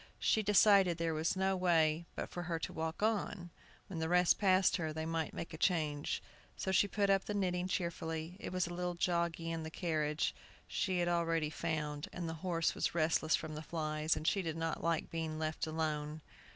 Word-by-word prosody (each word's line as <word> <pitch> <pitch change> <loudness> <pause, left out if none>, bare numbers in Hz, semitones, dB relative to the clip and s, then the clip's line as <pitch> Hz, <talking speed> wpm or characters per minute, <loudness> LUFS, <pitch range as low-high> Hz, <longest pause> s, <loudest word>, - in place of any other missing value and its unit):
She 220 - +2
decided 200 -3 +5
there 165 -1 0
was 155 +4 0
no 190 0 +1
way 165 -3 +2
but - - -3
for 175 - -5
her 170 -1 -2
to 160 - -5
walk 160 +4 -3
on. 205 -5 -1 0.3
When 175 -4 -6
the 160 0 -1
rest 180 0 +4
passed 190 -1 +4
her, 160 -3 -2
they 160 +1 -4
might 165 -1 -1
make 165 - -6
a 160 - -7
change. 155 -6 0 0.3
So 190 - -1
she 195 +2 +4
put 200 0 +1
up 195 +1 +1
knitting 185 -3 0
cheerfully. 165 -2 -3
It - - -5
was 185 -1 +1
a 175 - -5
little 180 0 -2
joggly 170 -1 0
in 165 -1 -3
the 160 - -5
carriage, 155 -2 -1 0.3
she 185 -2 0
had 175 0 +1
already 165 -3 +1
found, 150 -3 -2
for - - -8
the 165 -1 -2
horse 170 -3 +1
was - - -1
restless 160 -1 +3
from 155 -1 -5
the 155 - -5
flies, 155 -1 -1
and 155 - -5
she 195 - +3
did 165 -2 -3
not 165 -1 -2
like 165 -1 0
being 160 -1 -3
left 155 0 -2
alone. 155 -1 -2
165 Hz, 205 wpm, -35 LUFS, 160-180 Hz, 0.3 s, decided